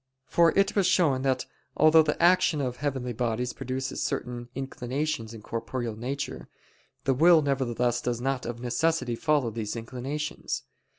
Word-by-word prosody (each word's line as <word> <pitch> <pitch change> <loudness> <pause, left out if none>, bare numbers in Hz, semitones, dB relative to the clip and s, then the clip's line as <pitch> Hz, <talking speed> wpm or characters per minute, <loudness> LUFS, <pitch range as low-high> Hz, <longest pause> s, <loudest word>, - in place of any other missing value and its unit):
For 170 +3 +4
it 195 +1 +3
was 195 -3 +3
shown 150 -9 +3
that 130 -1 0 0.3
although 155 +1 +7
the 150 -1 -1
action 175 -2 +4
of 125 -3 -2
heavenly 130 -4 -2
bodies 120 +1 -1
produces 130 +1 -4
certain 120 0 -3
inclinations 135 -2 -3
in 110 -2 -10
corporeal 115 0 -4
nature, 130 +4 -5 0.5
the 135 - +2
will 160 +3 +6
nevertheless 125 -3 0
does 120 -1 -2
not 130 0 -2
of 120 0 -5
necessity 125 +1 0
follow 145 -3 +1
these 110 -1 -4
inclinations. 130 +6 -4
130 Hz, 145 wpm, -27 LUFS, 120-150 Hz, 0.5 s, although